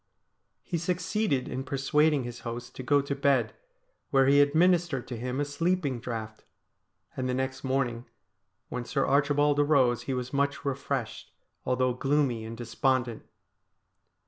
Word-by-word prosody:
He 170 Hz, -, -2 dB
succeeded 180 Hz, -3 st, -1 dB
in 130 Hz, +1 st, -4 dB
persuading 145 Hz, +1 st, +2 dB
his 120 Hz, 0 st, -7 dB
host 120 Hz, +1 st, -7 dB
to -, -, -6 dB
go 140 Hz, +3 st, +3 dB
to 140 Hz, -, -2 dB
bed, 140 Hz, -3 st, +2 dB, 0.6 s
where 135 Hz, -1 st, +4 dB
he 140 Hz, +1 st, +6 dB
administered 165 Hz, -1 st, +2 dB
to 125 Hz, -, -4 dB
him 125 Hz, +3 st, -3 dB
a 145 Hz, -, +1 dB
sleeping 150 Hz, -3 st, -1 dB
draught, 110 Hz, -2 st, -6 dB, 0.7 s
and 130 Hz, -1 st, -2 dB
the 125 Hz, -, 0 dB
next 130 Hz, 0 st, -3 dB
morning 125 Hz, -3 st, -1 dB, 0.6 s
when 125 Hz, -, -4 dB
Sir 135 Hz, +3 st, 0 dB
Archibald 145 Hz, +1 st, +2 dB
arose 140 Hz, -5 st, +3 dB
he 130 Hz, -, 0 dB
was 125 Hz, +1 st, -4 dB
much 140 Hz, +1 st, 0 dB
refreshed, 135 Hz, -4 st, -3 dB, 0.4 s
although 130 Hz, 0 st, +2 dB
gloomy 135 Hz, -3 st, 0 dB
and 115 Hz, +1 st, -7 dB
despondent. 120 Hz, 0 st, -1 dB
135 Hz, 145 wpm, -28 LUFS, 125-145 Hz, 0.7 s, he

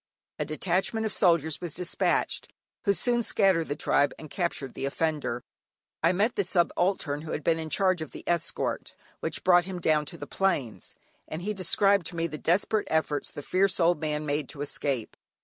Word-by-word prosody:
A -, -, 0 dB
detachment 190 Hz, +7 st, 0 dB
of 215 Hz, -, -1 dB
soldiers 165 Hz, -4 st, +2 dB
was 175 Hz, -4 st, -5 dB
despatched, 180 Hz, 0 st, 0 dB, 0.3 s
who 200 Hz, -, +4 dB
soon 240 Hz, +3 st, +1 dB
scattered 190 Hz, -7 st, +2 dB
the 145 Hz, -, -2 dB
tribe 145 Hz, -1 st, +2 dB
and 155 Hz, -, -11 dB
captured 170 Hz, -7 st, -2 dB
the -, -, -4 dB
offender. 145 Hz, -4 st, -1 dB, 0.6 s
I 165 Hz, -, +4 dB
met 205 Hz, +6 st, +1 dB
the 200 Hz, -, +1 dB
subaltern 175 Hz, -4 st, +1 dB
who 155 Hz, -, -5 dB
had 150 Hz, -, -3 dB
been 165 Hz, +1 st, +2 dB
in 160 Hz, -1 st, -5 dB
charge 185 Hz, -1 st, +2 dB
of 155 Hz, -, -5 dB
the -, -, -10 dB
escort, 170 Hz, -1 st, -1 dB, 0.2 s
which -, -, -3 dB
brought 175 Hz, -1 st, +5 dB
him 185 Hz, -1 st, -5 dB
down 155 Hz, -2 st, +2 dB
to 170 Hz, -, -6 dB
the 145 Hz, -, -6 dB
plains, 145 Hz, -, -1 dB, 0.3 s
and 160 Hz, +3 st, -5 dB
he 210 Hz, +2 st, -1 dB
described 195 Hz, -1 st, +2 dB
to -, -, -8 dB
me 165 Hz, 0 st, 0 dB
the 155 Hz, -2 st, -5 dB
desperate 205 Hz, +5 st, +1 dB
efforts 155 Hz, -2 st, 0 dB
the 145 Hz, -, -8 dB
fierce 190 Hz, +4 st, +2 dB
old 170 Hz, -2 st, +3 dB
man 150 Hz, -1 st, -1 dB
made 145 Hz, -1 st, -1 dB
to 145 Hz, -, -7 dB
escape. 140 Hz, -5 st, -2 dB
170 Hz, 190 wpm, -28 LUFS, 150-190 Hz, 0.6 s, brought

